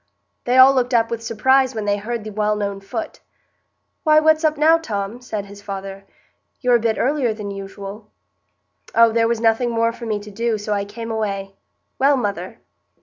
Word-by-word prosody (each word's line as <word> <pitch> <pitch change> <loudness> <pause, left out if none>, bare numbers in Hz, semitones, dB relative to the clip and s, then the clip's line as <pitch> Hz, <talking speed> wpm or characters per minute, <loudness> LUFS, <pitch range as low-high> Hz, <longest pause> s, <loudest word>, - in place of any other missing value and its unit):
They 245 +1 +2
all 260 +1 +8
looked 250 -1 +1
up 230 0 +2
with 230 -1 -3
surprise 255 +3 +2
when 215 -1 -3
they 205 0 +1
heard 225 +2 -4
the 215 - -7
well 210 0 0
known 200 -1 -3
foot. 200 +4 -6 0.8
"Why, 310 -2 +5
what's 315 +1 +3
up 310 -1 +2
now, 320 +2 +5
Tom?" 215 -5 -4
said 215 -5 -5
his 200 0 -13
father. 195 0 -7 0.5
"You're 245 -1 +4
a - - -6
bit 225 -1 0
earlier 260 -4 0
than 205 -2 -6
usual." 200 +2 -8 0.9
"Oh, 230 0 +6
there 230 0 +2
was 235 -1 0
nothing 225 +2 +2
more 230 0 +1
for 235 0 -9
me 215 -1 0
to 210 0 -11
do, 230 +2 -1
so 210 0 -3
I 200 -1 -1
came 230 +3 -7
away. 200 -3 -3 0.5
Well, 275 +1 +4
mother!" 200 -6 -3
225 Hz, 195 wpm, -20 LUFS, 205-245 Hz, 0.9 s, all